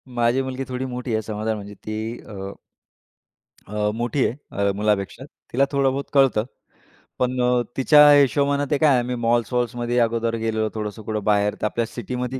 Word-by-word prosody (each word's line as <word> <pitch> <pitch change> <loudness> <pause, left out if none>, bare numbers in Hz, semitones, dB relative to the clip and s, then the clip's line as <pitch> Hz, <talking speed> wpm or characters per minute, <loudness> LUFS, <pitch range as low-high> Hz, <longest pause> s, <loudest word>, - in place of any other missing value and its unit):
माझी 120 +2 +2
मुलगी 130 0 -4
थोडी 130 +1 -3
मोठी 125 -2 -4
आहे 110 - +1
समजा 110 +1 -3
म्हणजे 105 0 -8
ती 110 0 -3 0.3
अ 95 -2 -7 1.2
अ, 105 0 -1
मोठी 120 +4 0
आहे. 120 - -3 0.3
अ, - - +1
मुलापेक्षा. 105 +4 -1 0.3
तिला 135 +3 +3
थोडं 140 -1 +2
बहुत 140 +1 -3
कळतं, 135 -6 +4 0.8
पण 125 0 0
अ, 125 0 +3 0.2
तिच्या 150 +2 +7
हिशोबाने 140 +1 +3
ते 145 - +3
काय 155 -1 +4
आहे 130 -3 +4
आम्ही 125 +1 -2
मॉल्स-वॉल्समध्ये 120 +1 0
अगोदर 115 0 -1
गेलो, 110 -1 0
थोडंसं 105 0 -5
कुठं 105 0 -3
बाहेर 105 0 +2
तर - - 0
आपल्या 115 +2 0
सिटीमध्ये 125 +3 -5
120 Hz, 170 wpm, -22 LUFS, 110-130 Hz, 1.2 s, तिच्या